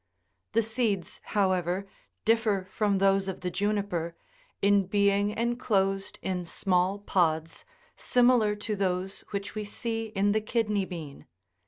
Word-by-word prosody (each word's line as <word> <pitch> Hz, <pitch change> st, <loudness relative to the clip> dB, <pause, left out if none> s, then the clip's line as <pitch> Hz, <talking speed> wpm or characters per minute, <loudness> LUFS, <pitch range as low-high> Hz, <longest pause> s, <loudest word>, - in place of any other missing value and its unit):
The 230 Hz, -, +3 dB
seeds, 220 Hz, -5 st, -1 dB
however, 185 Hz, -2 st, +1 dB, 0.4 s
differ 220 Hz, -4 st, +2 dB
from 205 Hz, -3 st, +1 dB
those 195 Hz, 0 st, +3 dB
of 190 Hz, -, -4 dB
the 180 Hz, -1 st, -2 dB
juniper, 190 Hz, -3 st, -1 dB, 0.4 s
in 200 Hz, -1 st, +3 dB
being 200 Hz, 0 st, +3 dB
enclosed 210 Hz, -4 st, 0 dB
in 180 Hz, -1 st, -2 dB
small 180 Hz, +2 st, +1 dB
pods 165 Hz, -5 st, 0 dB, 0.3 s
similar 245 Hz, -4 st, +3 dB
to 210 Hz, +1 st, -3 dB
those 190 Hz, -1 st, -1 dB
which 200 Hz, -1 st, -4 dB
we 215 Hz, -, -3 dB
see 225 Hz, +2 st, -3 dB
in 205 Hz, -1 st, +1 dB
the 215 Hz, +1 st, +1 dB
kidney 210 Hz, -3 st, 0 dB
bean. 160 Hz, -6 st, -8 dB
200 Hz, 130 wpm, -28 LUFS, 185-215 Hz, 0.4 s, The